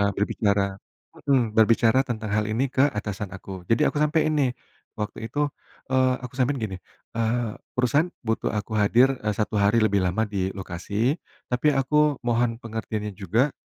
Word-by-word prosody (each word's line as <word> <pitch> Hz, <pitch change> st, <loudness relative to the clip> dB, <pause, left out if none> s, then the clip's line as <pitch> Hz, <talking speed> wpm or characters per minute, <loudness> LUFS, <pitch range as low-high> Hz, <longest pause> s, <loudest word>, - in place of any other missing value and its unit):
eee, 100 Hz, 0 st, +3 dB
berbicara 100 Hz, -1 st, 0 dB, 0.5 s
mhm, 125 Hz, -6 st, +3 dB
berbicara 115 Hz, +2 st, +5 dB
tentang 110 Hz, -4 st, -4 dB
hal 105 Hz, 0 st, +1 dB
ini 125 Hz, +5 st, 0 dB
ke 135 Hz, +2 st, +4 dB
atasan 105 Hz, -4 st, -4 dB
aku. 95 Hz, -2 st, -9 dB
Jadi 115 Hz, -, +3 dB
aku 145 Hz, -, -2 dB
sampaiin 155 Hz, +1 st, +2 dB
nih, 135 Hz, -3 st, +3 dB, 0.4 s
waktu 110 Hz, +1 st, -5 dB
itu, 145 Hz, 0 st, +1 dB, 0.4 s
eee, 130 Hz, -1 st, +3 dB
aku 125 Hz, -, -7 dB
sampaikan 130 Hz, 0 st, +1 dB
gini, 95 Hz, -4 st, -3 dB, 0.4 s
eee, 115 Hz, 0 st, 0 dB, 0.2 s
"Perusahaan 135 Hz, +7 st, +2 dB, 0.2 s
butuh 110 Hz, -, 0 dB
aku 110 Hz, +1 st, -3 dB
hadir, 125 Hz, +6 st, +4 dB
eee, 105 Hz, 0 st, 0 dB
1 105 Hz, 0 st, -1 dB
hari 105 Hz, +3 st, +3 dB
lebih 100 Hz, -2 st, +3 dB
lama 90 Hz, +5 st, +1 dB
di 95 Hz, -2 st, -2 dB
lokasi, 100 Hz, -, -1 dB, 0.3 s
tapi 125 Hz, +5 st, +2 dB
aku 150 Hz, +1 st, +2 dB
mohon 120 Hz, -1 st, +1 dB
pengertiannya 110 Hz, -2 st, -4 dB
juga, 110 Hz, -, +1 dB
115 Hz, 165 wpm, -25 LUFS, 105-130 Hz, 0.5 s, berbicara